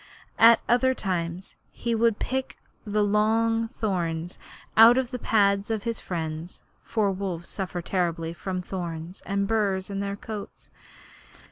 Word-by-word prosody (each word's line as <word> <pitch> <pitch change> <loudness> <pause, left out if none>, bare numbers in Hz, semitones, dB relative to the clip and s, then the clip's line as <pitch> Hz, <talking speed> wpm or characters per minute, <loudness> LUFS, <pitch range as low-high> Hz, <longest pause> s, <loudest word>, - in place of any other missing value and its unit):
At 230 0 +8
other 260 +2 +3
times 180 -2 -3
he 235 - -3
would 230 -1 +2
pick 260 +1 -3 0.3
the 210 0 +1
long 225 +2 +2
thorns 175 -7 -3 0.4
out 230 +3 +8
of 260 -1 0
the 250 - -4
pads 200 -2 +2
of 220 -2 -1
his 230 -1 -2
friends, 160 -1 -5 0.2
for 210 -3 0
wolves 185 -3 -4
suffer 180 -3 -4
terribly 170 -3 -1
from 185 +1 -4
thorns 175 -1 -6
and 200 0 0
burs 200 -3 0
in 195 - -3
their 200 0 -2
coats. 210 0 -8
200 Hz, 140 wpm, -26 LUFS, 180-225 Hz, 0.4 s, At